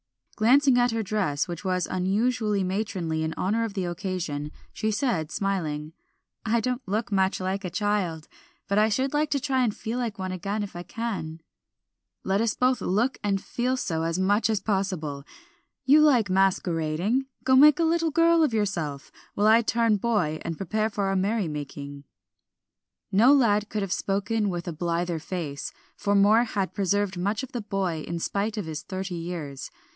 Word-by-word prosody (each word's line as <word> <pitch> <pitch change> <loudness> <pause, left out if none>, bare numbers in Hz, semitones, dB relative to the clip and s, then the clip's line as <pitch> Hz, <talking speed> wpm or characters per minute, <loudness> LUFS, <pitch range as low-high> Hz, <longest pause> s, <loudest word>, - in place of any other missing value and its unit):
Glancing 255 +3 +4
at 245 0 +3
her 225 -1 -1
dress, 185 -9 -1
which 175 0 -6
was 185 -2 0
unusually 210 +2 0
matronly 185 -4 -2
in 160 0 -2
honor 215 +5 0
of 220 -3 -4
the 190 -2 -1
occasion, 175 -5 -3 0.2
she 220 - -1
said 210 - 0
smiling 160 -6 -2 0.5
"I 230 +1 +2
don't 250 +2 -2
look 210 +3 -2
much 190 -1 +1
like 190 +2 -2
a 180 - -3
child, 180 -4 -1 0.4
but 200 +1 +2
I 215 +1 +4
should 260 +6 0
like 300 0 +1
to 280 - +1
try 260 -1 0
and 220 -4 0
feel 230 +3 -4
like 230 -4 -3
one 185 -1 -4
again 200 +3 -3
if 200 - -8
I 175 - -5
can." 180 -7 -5 0.8
"Let 195 +2 +1
us 225 -2 0
both 255 0 +2
look 215 +8 0
and 200 -1 +1
feel 250 +5 -2
so 160 -9 -2
as 165 +1 -1
much 205 +3 +2
as 215 -2 +1
possible. 185 -10 -2 0.6
You 290 +4 +6
like 250 -10 +4
masquerading; 185 +4 +1 0.2
go 260 - +4
make 295 +3 +8
a 335 - +1
little 330 0 +2
girl 335 +1 +4
of 285 -8 +2
yourself, 165 -10 -2 0.2
while 205 - +1
I 220 +2 +6
turn 230 -1 +2
boy, 190 -8 0
and 165 -1 -4
prepare 215 +3 -1
for 205 -1 -3
our 195 0 0
merry 200 +1 0
making." 145 -1 -7 1.1
No 225 +7 +6
lad 215 -7 +3
could 210 -2 -2
have 195 -1 -1
spoken 205 +2 -1
with 175 -1 -4
a 170 - -3
blither 170 +1 -1
face, 155 -4 -5 0.2
for 205 0 0
Moor 210 +4 +5
had 200 -4 -2
preserved 200 -1 0
much 205 +6 -1
of 265 - -7
the 240 - -3
boy 190 -6 -2
in 170 - -3
spite 205 +6 -2
of 205 - -2
his 160 -1 -5
thirty 190 -1 -5
years. 165 -5 -5
200 Hz, 180 wpm, -26 LUFS, 175-225 Hz, 1.1 s, make